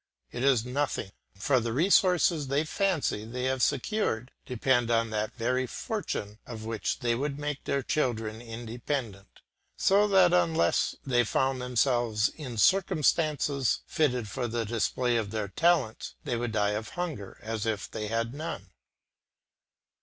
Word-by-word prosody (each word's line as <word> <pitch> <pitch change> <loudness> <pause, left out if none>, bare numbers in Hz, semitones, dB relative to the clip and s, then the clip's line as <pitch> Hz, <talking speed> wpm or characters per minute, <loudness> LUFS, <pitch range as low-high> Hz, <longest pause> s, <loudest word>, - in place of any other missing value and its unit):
It 120 - -4
is 130 -4 +3
nothing, 125 -6 -2 0.2
for 130 +7 +2
the 115 -1 -2
resources 175 -1 +3
they 140 +3 +1
fancy 160 - 0
they 125 +3 -5
have 130 0 0
secured 125 - 0 0.2
depend 125 -1 +1
on 115 -1 +2
that 110 0 -2
very 125 +1 0
fortune 110 - -4
of 110 -3 -7
which 110 -3 -2
they 120 -1 +1
would 140 +3 -2
make 145 -1 -4
their 140 -1 0
children 115 -6 -1
independent; 115 -2 -5 0.4
so 200 +2 +4
that 190 -3 +5
unless 165 -2 +2
they 120 -3 +3
found 130 +3 0
themselves 120 -3 +1
in 130 -7 -8
circumstances 150 - +2
fitted 125 -7 0
for 120 +5 -3
the 115 0 -2
display 120 +2 0
of 110 -3 -2
their 105 -2 -3
talents, 155 - +1
they 130 -5 -2
would 120 0 -2
die 105 -1 +2
of 105 +1 -3
hunger 155 - -4
as 110 0 -3
if 105 -3 -2
they 105 - -4
had 115 +2 -1
none. 145 - -6
125 Hz, 145 wpm, -28 LUFS, 110-145 Hz, 0.4 s, that